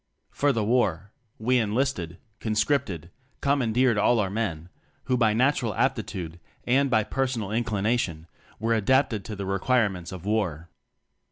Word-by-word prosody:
For 145 0 +2
the 115 -5 0
War, 105 -5 +1 0.3
we 125 +3 +2
enlisted, 105 -6 -1 0.2
conscript 110 +5 +1
ed, 85 -1 -7 0.3
commandeered 125 -4 +2
all 120 +3 +3
our 95 -2 0
men 90 -6 -3 0.3
who 130 - 0
by 110 -3 +3
natural 125 -4 +1
aptitude, 85 -2 -2 0.3
and 135 +3 +3
by 110 -4 +3
personal 125 -5 -2
in 115 +2 +1
clination, 105 -6 -1 0.3
were 115 +1 +1
adapted 115 0 +2
to 110 - -5
the 100 -1 -5
require 105 +4 +2
ments 90 -1 -8
of 95 -1 -8
war. 90 -7 -1
110 Hz, 150 wpm, -26 LUFS, 95-125 Hz, 0.3 s, all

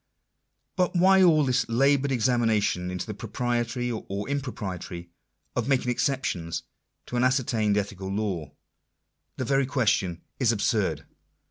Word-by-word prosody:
But 180 0 +1
why 190 +2 +6
all 160 -5 +5
this 130 -1 +1
laboured 140 +3 +3
examination 115 -7 +1
into 90 0 -4
the 105 - -5
propriety, 120 +2 -2
or 100 -3 -4
impropriety, 95 -11 -5 0.4
of - - -1
making 130 -3 +2
exceptions 120 -11 -1 0.4
to 125 - -4
an 120 - +2
ascertained 115 -5 +2
ethical 100 -2 -3
law? 95 -6 -2 0.9
The 130 - -2
very 135 +1 +2
question 100 -10 0 0.2
is 125 -4 +3
absurd. 100 - 0
120 Hz, 125 wpm, -26 LUFS, 100-135 Hz, 0.9 s, why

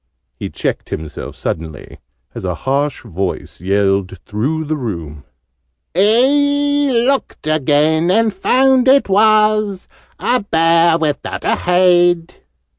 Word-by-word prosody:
He - - -6
checked - - -4
himself 75 -1 -7
suddenly, 80 -3 -6 0.3
as - - -8
a - - -2
harsh 140 +1 -2
voice 95 -5 -5
yelled 95 0 0
through 140 +10 -2
the 155 +1 -2
room, 85 - -6 0.7
"He 285 - +2
looked 250 - -1
again, 155 +2 +1
and 220 +2 +2
found 260 +6 +2
it 275 +1 +4
was 215 -1 +2 0.3
A 250 +1 0
Bear 165 -4 +2
without 155 -3 -3
a - - +1
Head!" 175 -1 +2
170 Hz, 115 wpm, -16 LUFS, 130-220 Hz, 0.7 s, it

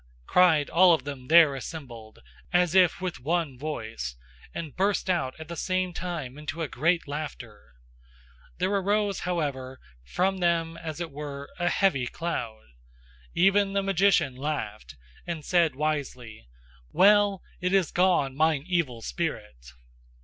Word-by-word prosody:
cried 165 - +4
all 175 -1 +6
of 135 - -8
them 135 -3 -7
there 160 -3 +7
assembled, 125 -6 -8 0.3
as 180 -1 +2
if 185 -2 +4
with 185 -2 -4
one 160 0 -1
voice, 115 - -5 0.4
and 160 -5 -7
burst 195 0 +1
out 135 -8 -1
at 160 - -8
the 170 - -6
same 185 +1 -1
time 155 -7 -5
into 160 +2 -4
a - - -2
great 165 +6 0
laughter; 140 - -7 0.8
there 185 +2 0
arose, 200 0 +1
however, 140 -7 -3 0.2
from 185 - -1
them 165 -2 +1
as 160 -1 -7
it 170 -3 -4
were 140 -1 -7
a 175 - +1
heavy 140 -11 +1
cloud. 120 -11 -4 0.7
Even 195 +2 +3
the 200 0 +1
magician 195 -8 +2
laughed, 125 - -5 0.3
and 165 -3 -5
said 170 -6 +2
wisely: 130 - -4 0.4
"Well! 205 0 +4 0.2
It 180 +1 -1
is 190 -4 +2
gone, 175 -7 +2
mine 155 -1 +2
evil 160 -11 -1
spirit! 105 - -5
160 Hz, 140 wpm, -27 LUFS, 135-180 Hz, 0.8 s, there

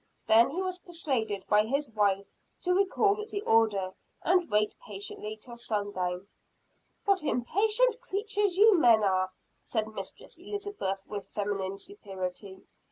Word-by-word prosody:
Then 225 +1 +6
he 355 +7 -2
was 370 -1 -3
persuaded 260 - -2
by 210 0 +5
his 280 +5 0
wife 200 -2 +2 0.4
to 360 - +2
recall 400 +2 +2
the 405 - -3
order, 215 - +2 0.3
and 360 0 +3
wait 210 0 +2
patiently 210 +1 -6
till 235 +2 -8
sundown. 200 -5 -2 0.8
"What 395 -3 +3
impatient 430 - +1
creatures 415 -4 -1
you 415 -3 +7
men 230 -6 +6
are!" 185 -1 +2 0.3
said 220 -2 -1
Mistress 220 - -6
Elizabeth 405 - -4
with 205 -2 -6
feminine 195 -2 -2
superiority. 190 - -7
225 Hz, 130 wpm, -29 LUFS, -, 0.8 s, you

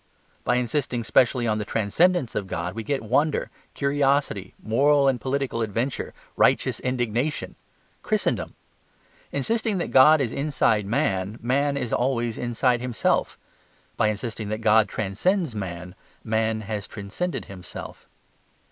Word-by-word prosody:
By 125 - +2
insisting 125 0 -1
specially 125 +2 +3
on 110 -1 +1
the - - -1
transcendence 125 - +1
of 100 - -2
God 85 0 -3
we 115 - -4
get 135 +4 -2
wonder, 145 +7 +1 0.2
curiosity, 140 -7 0
moral 140 +5 +3
and 130 -4 +1
political 135 -2 -1
adventure, 115 +5 -2 0.2
righteous - - +2
indignation 125 +3 -1 0.5
Christendom. - - -1 0.8
Insisting 220 - 0
that 175 - -3
God 150 +4 +7
is 125 -5 -1
inside 135 -8 +1
man, 105 -5 0
man 140 +4 +1
is 125 -4 -3
always 120 -3 0
inside 120 0 +1
himself. 125 -2 0 0.6
By - - +2
insisting 110 0 -3
that 110 +1 -3
God 110 -1 +4
transcends 135 - 0
man, 90 -3 -6 0.3
man 110 0 0
has 105 -1 -4
transcended 110 - -4
himself. 95 -2 -9
120 Hz, 130 wpm, -25 LUFS, 110-140 Hz, 0.8 s, God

